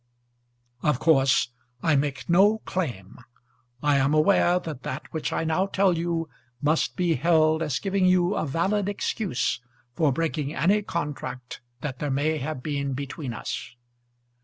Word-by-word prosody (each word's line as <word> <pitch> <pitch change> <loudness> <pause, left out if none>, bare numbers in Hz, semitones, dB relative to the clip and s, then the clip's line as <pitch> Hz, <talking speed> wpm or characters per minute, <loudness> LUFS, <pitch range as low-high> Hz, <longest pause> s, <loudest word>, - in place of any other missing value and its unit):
Of 150 -4 +2
course 135 -4 +3 0.3
I 160 -2 +3
make 140 0 -1
no 195 +5 +5
claim. 120 - -4 0.6
I 145 -1 +4
am 140 +2 +2
aware 175 +2 +4
that 155 -7 -6
that 130 - -5
which 160 - -2
I - - -1
now 165 +4 +1
tell 195 -2 +2
you 165 -1 -1 0.3
must 150 +4 +1
be 180 -2 +1
held 160 +2 +3
as 150 -5 0
giving 195 -2 +1
you 180 +1 +3
a 155 - -1
valid 190 +7 0
excuse 185 - -1 0.3
for 150 +1 +2
breaking 155 0 -2
any 195 +10 +3
contract 145 -8 -5 0.2
that 135 -4 -4
there 145 - -2
may 150 +3 0
have 140 -1 -4
been 140 -2 -2
between 140 0 -5
us. 115 - -6
155 Hz, 150 wpm, -26 LUFS, 140-175 Hz, 0.6 s, no